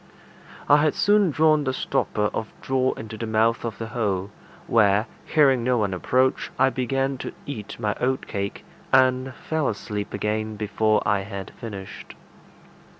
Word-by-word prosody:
I 145 - +7
had 150 0 +2
soon 205 -2 +4
drawn 155 0 +3
the 130 -1 -1
stopper 105 -4 -1
of 110 - -4
straw 130 -1 +1
into 110 0 -8
the 115 - -3
mouth 110 +1 +2
of 115 -3 -4
the 115 -1 -5
hole, 100 -5 -1 0.3
where, 105 -1 +3 0.2
hearing 135 -5 +4
no 125 0 +2
one 105 -4 0
approach, 130 +8 +1
I 135 +1 +4
began 135 +1 -1
to - - -5
eat 110 -7 -7
my 105 -1 0
oatcake, 125 -6 -2 0.3
and 130 0 +3
fell 160 -2 -1
asleep 105 -1 -4
again 110 +1 -2
before 105 0 +1
I 100 - +3
had 100 -1 -7
finished. 100 -5 -9
115 Hz, 150 wpm, -24 LUFS, 105-130 Hz, 0.3 s, I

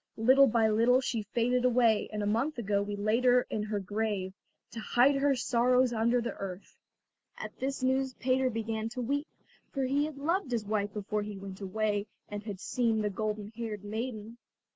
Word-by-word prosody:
Little 260 +5 +6
by 225 -2 +3
little 230 +4 +4
she 245 -4 -2
faded 240 +4 0
away, 235 -3 +3
and 210 -1 -3
a - - -1
month 235 +9 0
ago 200 -3 0
we 205 0 -3
laid 215 +4 +1
her 250 0 +5
in 215 - -1
her 210 0 -2
grave, 200 -1 -2 0.4
to 235 - -6
hide 245 +5 +3
her 275 0 +3
sorrows 250 0 +2
under 235 +2 +2
the 235 0 -3
earth." 190 -1 -7 0.6
At - - -8
this 270 0 -3
news 260 0 +1
Peter 260 +1 +1
began 225 -1 -3
to 250 - -2
weep, 285 +5 -1 0.4
for 275 - -2
he 280 +3 +1
had 305 -2 -7
loved 330 +3 -1
his 235 -4 -1
wife 205 -1 -1
before 210 +1 -3
he 205 -1 -6
went 195 0 -9
away 205 +1 -1 0.2
and 205 0 -5
had 205 -3 -7
seen 225 -2 0
the 210 - 0
golden 210 0 -3
haired 220 -4 -5
maiden. 220 +1 -5
225 Hz, 190 wpm, -30 LUFS, 210-255 Hz, 0.6 s, Little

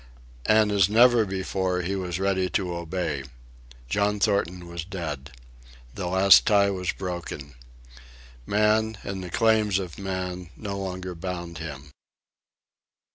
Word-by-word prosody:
And 110 -1 +4
as 100 -2 +4
never 120 +1 +6
before, 95 -1 -1
he 95 +3 -2
was 90 -2 -3
ready 95 -1 +1
to 90 -4 -3
obey. 85 -4 -3 0.6
John 105 +7 +1
Thornton 90 -4 0
was 85 -1 -5
dead. 80 -6 -5 0.6
The 90 +3 -4
last 95 +2 +6
tie 100 -1 +4
was 90 -2 -2
broken. 85 -6 -6 0.9
Man 110 +1 +2
and 95 -1 -5
the 90 - -6
claims 110 -1 +3
of 90 -3 -5
man 90 -2 -4
no 100 -2 -5
longer 95 -1 -4
bound 85 -1 -6
him. 75 -3 -8
95 Hz, 130 wpm, -26 LUFS, 85-100 Hz, 0.9 s, never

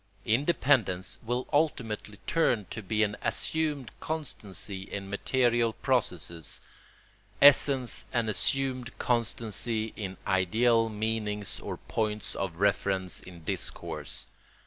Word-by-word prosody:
Independence 115 - +2
will 120 +2 -2
ultimately 115 -9 0
turn 145 -9 +2
out 100 - -19
to 110 - -4
be 110 +2 +1
an 105 -1 0
assumed 150 -5 -1
constancy 105 -11 -4
in 100 0 -6
material 120 +1 +2
processes, 90 - -1 0.8
essence 135 -6 +5
an 120 -3 +1
assumed 130 +2 +1
constancy 115 -1 -1
in 95 -3 -5
ideal 115 +5 +3
meanings 105 -1 -2
or - - -5
points 105 -1 -2
of 95 -4 -3
reference 95 -1 +1
in 85 -3 -12
discourse. 80 -1 -3
110 Hz, 105 wpm, -29 LUFS, 100-125 Hz, 0.8 s, essence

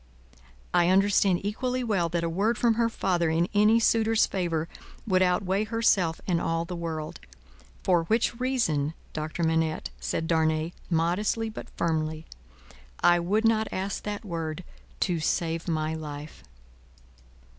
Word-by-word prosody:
"I 175 0 +4
understand 195 -1 +3
equally 250 +4 -1
well, 195 -8 0
that 170 0 -1
a - - 0
word 205 +7 0
from 235 -2 +3
her 230 0 +1
father 175 -6 0
in 165 +2 +1
any 210 +2 +5
suitor's 225 -1 +3
favour, 165 -4 -2 0.4
would 185 -3 +2
outweigh 185 +3 +1
herself 210 -7 +2
and 175 -3 +1
all 165 0 -1
the 180 - -6
world. 160 -2 -5 0.6
For 175 -3 +2
which 230 +4 +1
reason, 165 - 0 0.2
Doctor 155 +2 -3
Manette," 160 -1 0
said 165 - -2
Darnay, 160 0 +1 0.2
modestly 185 +7 0
but - - -9
firmly, 160 -1 -1 0.8
"I 175 0 +6
would 205 +6 +1
not 220 -1 +3
ask 190 +1 -3
that 210 +1 -5
word, 165 -2 -4 0.4
to 175 -3 +1
save 165 +1 -1
my 155 -1 -1
life." 150 - -7
175 Hz, 140 wpm, -27 LUFS, 160-210 Hz, 0.8 s, I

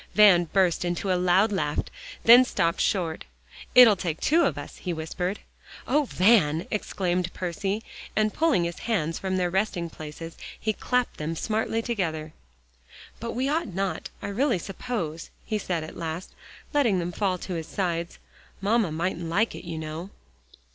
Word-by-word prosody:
Van 195 -5 +7
burst 180 -1 +2
into 175 +2 -1
a - - +4
loud 180 +4 +3
laugh, 150 -7 -1 0.5
then 240 +2 +9
stopped 170 -9 0
short. 170 -5 0 0.5
"It'll 240 -4 +9
take 170 -4 -3
two 325 +4 +3
of 155 - 0
us," 145 - -8
he 180 - -3
whispered. 180 +4 -3 0.5
"Oh, 295 +2 +3
Van!" 180 - +3
exclaimed 180 -4 -1
Percy, 195 +4 -2 0.3
and 215 0 +2
pulling 315 - +2
his 170 0 -4
hands 165 -7 0
from 190 -1 -1
their 180 -1 0
resting 185 -3 -1
places, 160 +2 -8 0.2
he 215 - 0
clapped 250 +3 -1
them 155 +2 -3
smartly 225 +4 -1
together. 160 -10 -2 0.9
"But 230 0 -4
we 255 +3 0
ought 315 +2 0
not, 195 -1 -2
I - - -3
really 240 +2 +1
suppose," 175 -3 -4 0.2
he 215 -1 -1
said 175 -5 -2
at 155 - -9
last, 165 +2 -5 0.4
letting 250 -10 +3
them 175 0 -2
fall 185 0 0
to 185 +1 -6
his 165 -2 -4
sides. 170 -3 -2 0.4
"Mamma 205 -2 +2
mightn't 170 +1 -2
like 210 +7 +1
it, - - -9
you 170 -2 -5
know." 160 +4 -5
185 Hz, 160 wpm, -26 LUFS, 165-215 Hz, 0.9 s, then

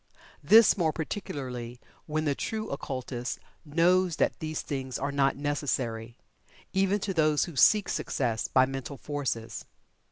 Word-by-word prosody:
This, 215 +8 +7
more 160 -2 +2
particularly, 130 - -5 0.3
when 155 0 -1
the 145 - +2
true 215 +9 -4
occultist 130 -3 -4 0.3
knows 170 +3 +2
that - - 0
these 155 0 -3
things 130 -3 -4
are 140 +2 -2
not 140 -1 +2
necessary, 130 -6 -2 0.6
even 195 +2 +2
to 195 - -2
those 155 -3 +3
who 170 - -9
seek 205 +9 +5
"Success" 115 -4 -1
by 130 0 +4
mental 135 +1 -6
forces. 135 -6 -4
145 Hz, 135 wpm, -28 LUFS, 130-165 Hz, 0.6 s, This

